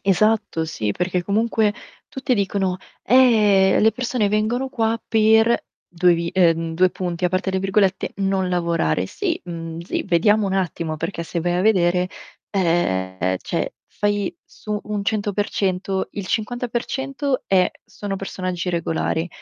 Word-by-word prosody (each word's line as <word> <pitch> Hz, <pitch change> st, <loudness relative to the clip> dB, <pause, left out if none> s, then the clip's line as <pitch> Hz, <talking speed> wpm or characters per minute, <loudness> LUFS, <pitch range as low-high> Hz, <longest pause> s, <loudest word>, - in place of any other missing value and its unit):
Esatto, 200 Hz, -3 st, +2 dB
sì, 110 Hz, -9 st, -2 dB
perché 180 Hz, 0 st, -1 dB
comunque 215 Hz, +1 st, +1 dB, 0.3 s
tutti 260 Hz, -1 st, -1 dB
dicono: 195 Hz, -2 st, 0 dB, 0.3 s
"Eh, 210 Hz, -6 st, +5 dB
le 220 Hz, 0 st, +4 dB
persone 240 Hz, -3 st, 0 dB
vengono 220 Hz, +5 st, 0 dB
qua 225 Hz, -3 st, 0 dB
per" 220 Hz, +1 st, +4 dB, 0.3 s
2 175 Hz, 0 st, +4 dB
vi 170 Hz, 0 st, -2 dB
ehm, 165 Hz, -3 st, +2 dB
2 185 Hz, +2 st, +4 dB
punti, 180 Hz, -1 st, -2 dB
aperte 185 Hz, +2 st, -1 dB
le 190 Hz, -, 0 dB
virgolette, 195 Hz, 0 st, +1 dB
"non 195 Hz, -1 st, 0 dB
lavorare". 170 Hz, -, 0 dB
Sì, -, -, -2 dB
uhm, 165 Hz, -1 st, -6 dB
sì, 170 Hz, -, -3 dB
vediamo 205 Hz, +3 st, +3 dB
un 190 Hz, -, -1 dB
attimo, 170 Hz, -4 st, -2 dB
perché 170 Hz, +2 st, -4 dB
se 170 Hz, +1 st, -3 dB
vai 175 Hz, +1 st, 0 dB
a -, -, +1 dB
vedere, 180 Hz, -3 st, +3 dB, 0.4 s
ehm 95 Hz, -, 0 dB
cioè -, -, -2 dB
fai 205 Hz, -2 st, -1 dB
su 210 Hz, -1 st, -5 dB
un 210 Hz, -1 st, -3 dB
100%, 200 Hz, -2 st, -1 dB
il 200 Hz, -3 st, -5 dB
50% 250 Hz, +5 st, -2 dB
è 185 Hz, -1 st, +3 dB
sono 200 Hz, -1 st, -5 dB
personaggi 185 Hz, -2 st, -3 dB
regolari; 165 Hz, 0 st, -1 dB
190 Hz, 140 wpm, -22 LUFS, 175-215 Hz, 0.4 s, Eh